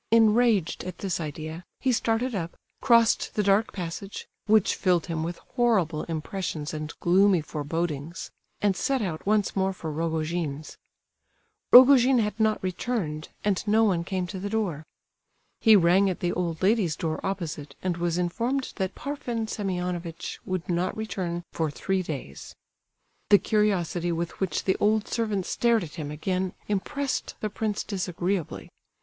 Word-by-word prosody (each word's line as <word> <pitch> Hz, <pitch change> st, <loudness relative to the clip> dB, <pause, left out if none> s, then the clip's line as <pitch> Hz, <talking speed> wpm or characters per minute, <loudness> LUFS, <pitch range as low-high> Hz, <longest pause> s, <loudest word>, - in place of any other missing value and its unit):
Enraged 225 Hz, -4 st, +3 dB
at 185 Hz, -, -6 dB
this 190 Hz, -3 st, -2 dB
idea, 155 Hz, +2 st, -6 dB, 0.2 s
he 260 Hz, -, +1 dB
started 235 Hz, +1 st, 0 dB
up, 170 Hz, -4 st, -4 dB, 0.2 s
crossed 230 Hz, -3 st, +4 dB
the 210 Hz, -, +2 dB
dark 200 Hz, +3 st, +3 dB
passage 185 Hz, +2 st, -6 dB, 0.2 s
(which 215 Hz, -2 st, +4 dB
filled 180 Hz, -4 st, +1 dB
him 165 Hz, -2 st, -3 dB
with 170 Hz, +2 st, -3 dB, 0.2 s
horrible 190 Hz, -11 st, +2 dB
impressions 165 Hz, -1 st, -4 dB
and 155 Hz, -1 st, -6 dB
gloomy 190 Hz, +1 st, +4 dB
forebodings), 155 Hz, +1 st, -4 dB, 0.3 s
and 205 Hz, -2 st, +2 dB
set 265 Hz, +4 st, 0 dB
out 165 Hz, -5 st, -4 dB
once 210 Hz, -1 st, +2 dB
more 190 Hz, 0 st, +1 dB
for 160 Hz, -4 st, -6 dB
Rogojin's. 160 Hz, -1 st, -2 dB, 1.0 s
Rogojin 255 Hz, 0 st, +8 dB
had 215 Hz, -1 st, 0 dB
not 215 Hz, -2 st, +2 dB
returned, 185 Hz, -5 st, -3 dB
and 205 Hz, -3 st, +1 dB
no 220 Hz, +2 st, +4 dB
one 185 Hz, -6 st, +2 dB
came 185 Hz, 0 st, -2 dB
to 185 Hz, +2 st, -6 dB
the 200 Hz, +2 st, -4 dB
door. 190 Hz, -9 st, -2 dB, 0.7 s
He 220 Hz, -2 st, +7 dB
rang 190 Hz, +1 st, +5 dB
at 185 Hz, -, -3 dB
the 175 Hz, -, 0 dB
old 170 Hz, -1 st, -2 dB
lady's 195 Hz, -6 st, +3 dB
door 160 Hz, -1 st, -2 dB
opposite, 155 Hz, -7 st, -4 dB
and 180 Hz, -2 st, -1 dB
was 170 Hz, 0 st, 0 dB
informed 235 Hz, +10 st, -1 dB
that 190 Hz, -2 st, -2 dB
Parfen 245 Hz, -6 st, -3 dB
Semionovitch 180 Hz, -5 st, -4 dB
would 185 Hz, -2 st, -3 dB
not 180 Hz, +3 st, -1 dB
return 180 Hz, -5 st, -3 dB
for 160 Hz, -2 st, 0 dB
three 190 Hz, +6 st, -1 dB
days. 140 Hz, -, -7 dB, 0.7 s
The 205 Hz, -, +8 dB
curiosity 190 Hz, -5 st, +1 dB
with 170 Hz, 0 st, -3 dB
which 190 Hz, -2 st, -1 dB
the 190 Hz, -, +1 dB
old 215 Hz, +1 st, +2 dB
servant 215 Hz, -5 st, -1 dB
stared 235 Hz, -3 st, +2 dB
at 155 Hz, -, -8 dB
him 150 Hz, -3 st, -5 dB
again 185 Hz, +5 st, -2 dB
impressed 270 Hz, +7 st, -2 dB
the 215 Hz, -, -3 dB
prince 215 Hz, -1 st, -2 dB
disagreeably. 180 Hz, -3 st, -3 dB
185 Hz, 150 wpm, -26 LUFS, 165-215 Hz, 1.0 s, Rogojin